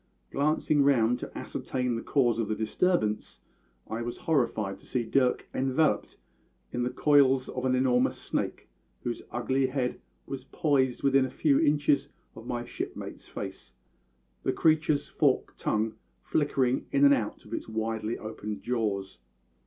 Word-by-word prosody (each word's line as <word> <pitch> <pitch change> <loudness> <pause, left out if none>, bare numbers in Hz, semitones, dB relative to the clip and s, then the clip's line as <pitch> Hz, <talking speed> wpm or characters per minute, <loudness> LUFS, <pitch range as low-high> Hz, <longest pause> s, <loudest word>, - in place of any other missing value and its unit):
Glancing 150 0 +2
round 125 -4 +3
to - - -7
ascertain 125 -2 -2
the 115 - -3
cause 120 -5 +2
of 115 - 0
the 110 - -1
disturbance, 110 - 0 0.5
I 110 +1 -3
was 120 0 -4
horrified 120 - 0
to - - -19
see 125 -2 -1
Dirk 125 +2 +1
enveloped 135 +4 +1 0.5
in 120 - -2
the 120 - +1
coils 135 -2 +4
of 130 0 -3
an 130 0 +3
enormous 125 -1 +2
snake, - - -3 0.4
whose 120 -1 -3
ugly 130 +2 0
head 130 -1 -2 0.2
was 135 -1 -6
poised 135 -6 +1
within 135 -1 +4
a - - -4
few 140 0 +2
inches 145 -1 +2 0.3
of 115 +2 -10
my 120 0 -3
shipmate's - - -6
face, 65 - -7 0.7
the - - 0
creature's 155 -2 +2
forked - - +1
tongue 110 +1 0 0.3
flickering 135 -4 +1
in 140 0 +5
and 140 - +8
out 115 -6 -2
of - - -10
its - - -4
widely 110 0 -2
opened 105 -2 -6
jaws. 100 - -2
125 Hz, 150 wpm, -28 LUFS, 115-140 Hz, 0.7 s, and